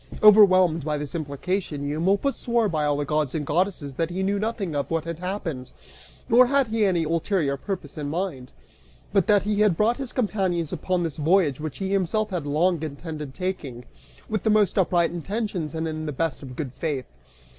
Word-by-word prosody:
Overwhelmed 185 -6 +7
by 150 0 -1
this 145 -1 -5
implication, 155 0 -3
Eumolpus 190 - +1
swore 235 -3 +1
by 155 -5 0
all 145 -1 +1
the 145 - -1
gods 150 -1 0
and 150 -2 -2
goddesses 165 -2 -1
that 165 +5 -1
he 185 +2 -2
knew 200 +1 0
nothing 210 -6 -2
of 140 - -2
what 165 -1 0
had 170 0 -5
happened, 175 -8 -4 0.6
nor 245 +2 +6
had 275 +1 +3
he 225 0 -1
had 205 - +5
any 170 - +1
ulterior 160 -2 0
purpose 155 -2 -6
in 145 -1 -3
mind, 150 -7 -3 0.6
but 195 -4 +3
that 205 -2 +4
he 210 0 0
had 205 -6 +3
brought 225 +3 +2
his 270 -3 -5
companions 190 - -1
upon 180 +1 -1
this 160 -4 -3
voyage 155 -3 +2
which 155 -1 -5
he 195 0 -3
himself 200 +2 0
had 170 -6 -3
long 165 +3 +2
intended 150 -2 -6
taking, 150 -10 -4 0.4
with 215 -3 -2
the - - +1
most 210 -2 +3
upright 175 -2 +2
intentions 180 -2 -3
and 160 0 -2
in 155 0 -4
the - - -2
best 165 +3 -2
of 130 -3 -9
good 130 -4 -5
faith. 145 -6 -3
170 Hz, 200 wpm, -25 LUFS, 150-200 Hz, 0.6 s, Overwhelmed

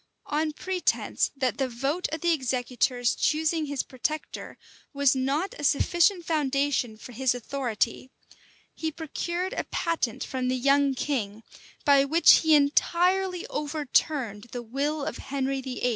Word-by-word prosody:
On 305 +1 0
pretence 365 +4 0
that 260 -1 -1
the 265 - +1
vote 275 +9 -1
of 315 - -4
the 345 - +2
executors 250 -2 0
choosing 315 0 0
his 285 -2 -2
protector, 300 +4 -5 0.4
was 280 -1 +3
not 275 +8 -1
a - - -6
sufficient 345 +5 +2
foundation 280 -6 0
for 235 - -11
his 250 +1 +1
authority, 245 -1 -2 0.6
he 320 -1 -3
procured 345 +4 -3
a - - -3
patent 330 -10 -2
from 255 -1 -3
the 255 0 0
young 275 +1 +3
king, 225 -6 -3 0.4
by 280 -2 +6
which 320 +5 +6
he 315 -1 +4
entirely 360 +6 +2
overturned 290 - -1
the 245 -1 -5
will 280 +5 -2
of - - -4
Henry 270 0 -2
VIII. 250 -1 -2
280 Hz, 140 wpm, -27 LUFS, 255-315 Hz, 0.6 s, by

